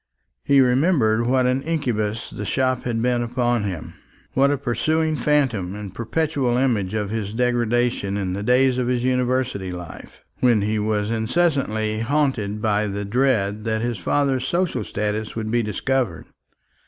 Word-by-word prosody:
He 140 Hz, -1 st, +5 dB
remembered 125 Hz, -4 st, +3 dB
what 130 Hz, 0 st, +3 dB
an 130 Hz, +1 st, +1 dB
incubus 120 Hz, -9 st, -2 dB
the 105 Hz, -, -6 dB
shop 130 Hz, +3 st, 0 dB
had 120 Hz, -2 st, -1 dB
been 125 Hz, -1 st, +1 dB
upon 120 Hz, -2 st, 0 dB
him; 90 Hz, -6 st, -5 dB, 0.4 s
what 140 Hz, +1 st, +4 dB
a 145 Hz, -, +1 dB
pursuing 155 Hz, +5 st, 0 dB
phantom 120 Hz, -10 st, +1 dB
and 105 Hz, -3 st, -7 dB
perpetual 125 Hz, +2 st, 0 dB
image 110 Hz, -7 st, 0 dB
of 105 Hz, -2 st, -2 dB
his 105 Hz, -2 st, -3 dB
degradation 120 Hz, -4 st, 0 dB
in 95 Hz, -2 st, -2 dB
the 100 Hz, -, -3 dB
days 125 Hz, +3 st, +3 dB
of 125 Hz, -, 0 dB
his 125 Hz, -1 st, 0 dB
University 125 Hz, -6 st, 0 dB
life, 90 Hz, -3 st, -10 dB, 0.2 s
when 120 Hz, -5 st, +3 dB
he 105 Hz, +1 st, 0 dB
was 105 Hz, 0 st, 0 dB
incessantly 110 Hz, -4 st, 0 dB
haunted 115 Hz, -5 st, 0 dB
by 105 Hz, -1 st, +1 dB
the 100 Hz, 0 st, -4 dB
dread 105 Hz, -3 st, +1 dB
that 110 Hz, 0 st, -1 dB
his 120 Hz, -4 st, -2 dB
father's 130 Hz, -, 0 dB
social 175 Hz, 0 st, 0 dB
status 105 Hz, +1 st, -3 dB
would 110 Hz, -1 st, -3 dB
be 120 Hz, 0 st, +2 dB
discovered. 115 Hz, -3 st, -1 dB
120 Hz, 155 wpm, -22 LUFS, 105-130 Hz, 0.4 s, He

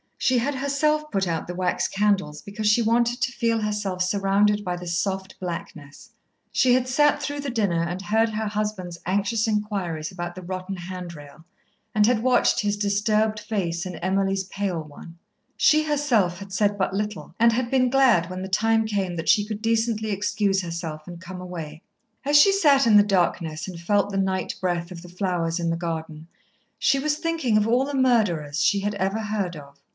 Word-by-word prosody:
She 255 Hz, -, +2 dB
had 275 Hz, +4 st, -1 dB
herself 300 Hz, +3 st, 0 dB
put 195 Hz, -2 st, 0 dB
out 165 Hz, -2 st, -2 dB
the 180 Hz, -, -5 dB
wax 180 Hz, 0 st, 0 dB
candles, 195 Hz, -7 st, 0 dB
because 210 Hz, +1 st, -4 dB
she 210 Hz, +3 st, +4 dB
wanted 235 Hz, +2 st, +1 dB
to 255 Hz, -, +1 dB
feel 230 Hz, -2 st, 0 dB
herself 210 Hz, -3 st, -2 dB
surrounded 200 Hz, +2 st, +2 dB
by 180 Hz, -2 st, -2 dB
the 175 Hz, 0 st, -8 dB
soft 190 Hz, +2 st, -2 dB
blackness. 170 Hz, -5 st, -7 dB, 0.4 s
She 255 Hz, -2 st, +3 dB
had 255 Hz, 0 st, +2 dB
sat 295 Hz, +3 st, +3 dB
through 290 Hz, 0 st, -3 dB
the 280 Hz, -, -4 dB
dinner 200 Hz, -9 st, 0 dB
and 175 Hz, +2 st, -4 dB
heard 220 Hz, +3 st, +2 dB
her 220 Hz, 0 st, -3 dB
husband's 205 Hz, -5 st, -3 dB
anxious 205 Hz, +4 st, 0 dB
inquiries 200 Hz, -7 st, -2 dB
about 175 Hz, -1 st, -5 dB
the 185 Hz, -, -9 dB
rotten 185 Hz, +2 st, -5 dB
handrail, 170 Hz, -4 st, -9 dB, 0.5 s
and 210 Hz, -2 st, +4 dB
had 235 Hz, -2 st, +2 dB
watched 255 Hz, 0 st, +3 dB
his 205 Hz, -1 st, -1 dB
disturbed 210 Hz, +1 st, +1 dB
face 185 Hz, -5 st, -2 dB
and 180 Hz, -3 st, -6 dB
Emily's 195 Hz, +1 st, 0 dB
pale 190 Hz, -3 st, -3 dB
one. 155 Hz, +2 st, -12 dB, 0.4 s
She 310 Hz, 0 st, +4 dB
herself 265 Hz, -, +1 dB
had 195 Hz, 0 st, -10 dB
said 205 Hz, 0 st, +1 dB
but 190 Hz, -1 st, -1 dB
little, 210 Hz, +1 st, -4 dB
and 235 Hz, +1 st, +6 dB
had 240 Hz, 0 st, -1 dB
been 255 Hz, -1 st, +3 dB
glad 240 Hz, -10 st, +4 dB
when 185 Hz, 0 st, -5 dB
the 190 Hz, -, -4 dB
time 225 Hz, +3 st, +2 dB
came 195 Hz, -5 st, -2 dB
that 165 Hz, -, -3 dB
she 215 Hz, -3 st, +5 dB
could 215 Hz, 0 st, -5 dB
decently 225 Hz, -1 st, 0 dB
excuse 200 Hz, -1 st, 0 dB
herself 165 Hz, -3 st, -6 dB
and 175 Hz, -1 st, -9 dB
come 185 Hz, 0 st, -8 dB
away. 165 Hz, -4 st, -7 dB, 0.4 s
As 290 Hz, +1 st, +5 dB
she 395 Hz, +7 st, +7 dB
sat 290 Hz, -10 st, +4 dB
in 215 Hz, -, +5 dB
the 205 Hz, -, +7 dB
darkness 170 Hz, -5 st, 0 dB
and 180 Hz, -3 st, -7 dB
felt 200 Hz, +3 st, +1 dB
the 195 Hz, -, -2 dB
night 190 Hz, -1 st, -1 dB
breath 175 Hz, -1 st, -1 dB
of 170 Hz, -2 st, -8 dB
the 175 Hz, -, -12 dB
flowers 175 Hz, -2 st, -1 dB
in 170 Hz, -1 st, -1 dB
the 165 Hz, -, 0 dB
garden, 160 Hz, -2 st, -5 dB, 0.5 s
she 275 Hz, -, +3 dB
was 295 Hz, +2 st, 0 dB
thinking 320 Hz, -9 st, 0 dB
of 210 Hz, 0 st, +2 dB
all 245 Hz, +4 st, +2 dB
the 285 Hz, 0 st, -4 dB
murderers 190 Hz, -, +1 dB
she 200 Hz, -, +3 dB
had 205 Hz, +1 st, -2 dB
ever 195 Hz, +2 st, -1 dB
heard 205 Hz, -5 st, -2 dB
of. 140 Hz, -1 st, -12 dB
200 Hz, 195 wpm, -24 LUFS, 175-225 Hz, 0.5 s, she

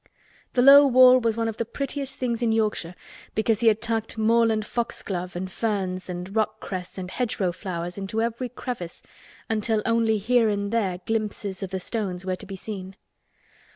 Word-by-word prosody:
The 245 Hz, -, +3 dB
low 280 Hz, +1 st, +9 dB
wall 255 Hz, 0 st, +7 dB
was 230 Hz, -2 st, 0 dB
one 230 Hz, 0 st, 0 dB
of 225 Hz, -1 st, -4 dB
the -, -, 0 dB
prettiest 275 Hz, +3 st, -4 dB
things 240 Hz, -2 st, -2 dB
in 235 Hz, -2 st, +2 dB
Yorkshire 210 Hz, -6 st, 0 dB, 0.4 s
because 220 Hz, 0 st, +1 dB
he 235 Hz, -, +2 dB
had 220 Hz, 0 st, +3 dB
tucked 225 Hz, -1 st, -2 dB
moorland 225 Hz, -1 st, +3 dB
foxglove 190 Hz, -6 st, -3 dB
and 185 Hz, +1 st, -4 dB
ferns 190 Hz, -4 st, -2 dB
and 180 Hz, +3 st, -6 dB
rock 215 Hz, 0 st, 0 dB
cress 185 Hz, -1 st, -6 dB
and 185 Hz, -1 st, -5 dB
hedgerow 210 Hz, -7 st, -1 dB
flowers 175 Hz, 0 st, -5 dB
into 195 Hz, +3 st, -3 dB
every 235 Hz, +2 st, -1 dB
crevice 235 Hz, -8 st, -6 dB, 0.4 s
until 220 Hz, -1 st, 0 dB
only 230 Hz, -1 st, +2 dB
here 225 Hz, +2 st, +3 dB
and 200 Hz, -1 st, -1 dB
there 200 Hz, -6 st, 0 dB
glimpses 210 Hz, -3 st, -2 dB
of 195 Hz, -, -4 dB
the 190 Hz, 0 st, -3 dB
stones 185 Hz, -3 st, -4 dB
were 185 Hz, -1 st, -1 dB
to 205 Hz, -, -11 dB
be 195 Hz, -, -6 dB
seen. 190 Hz, -1 st, -7 dB
215 Hz, 180 wpm, -25 LUFS, 190-230 Hz, 0.4 s, low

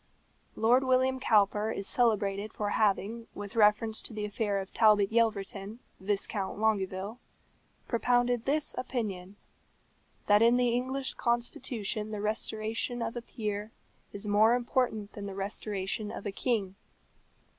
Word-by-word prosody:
Lord 245 Hz, +4 st, +4 dB
William 260 Hz, 0 st, +2 dB
Cowper 210 Hz, -2 st, +3 dB
is 200 Hz, -3 st, -3 dB
celebrated 210 Hz, -3 st, +1 dB
for 205 Hz, -1 st, -2 dB
having, 215 Hz, +2 st, 0 dB
with 205 Hz, +2 st, -7 dB
reference 215 Hz, 0 st, +3 dB
to -, -, -5 dB
the 210 Hz, -1 st, -3 dB
affair 205 Hz, -1 st, -1 dB
of 195 Hz, 0 st, -7 dB
Talbot 210 Hz, -3 st, +4 dB
Yelverton, 215 Hz, -2 st, 0 dB, 0.2 s
Viscount 200 Hz, 0 st, -1 dB
Longueville, 205 Hz, 0 st, -1 dB, 0.7 s
propounded 245 Hz, 0 st, +1 dB
this 295 Hz, +2 st, +1 dB
opinion: 205 Hz, -7 st, -4 dB, 0.9 s
That 205 Hz, +1 st, +5 dB
in 235 Hz, +1 st, +5 dB
the 250 Hz, -1 st, +3 dB
English 260 Hz, +3 st, -1 dB
constitution 235 Hz, -3 st, -2 dB
the 210 Hz, -1 st, -4 dB
restoration 220 Hz, +3 st, -2 dB
of 225 Hz, +1 st, -4 dB
a 240 Hz, -, -3 dB
peer 210 Hz, -2 st, -4 dB, 0.4 s
is 200 Hz, +1 st, -7 dB
more 215 Hz, +3 st, +5 dB
important 240 Hz, -4 st, -1 dB
than 200 Hz, -1 st, -6 dB
the 195 Hz, -, -6 dB
restoration 200 Hz, +1 st, -3 dB
of -, -, -7 dB
a 205 Hz, -, -2 dB
king. 200 Hz, -3 st, -1 dB
215 Hz, 135 wpm, -30 LUFS, 205-235 Hz, 0.9 s, That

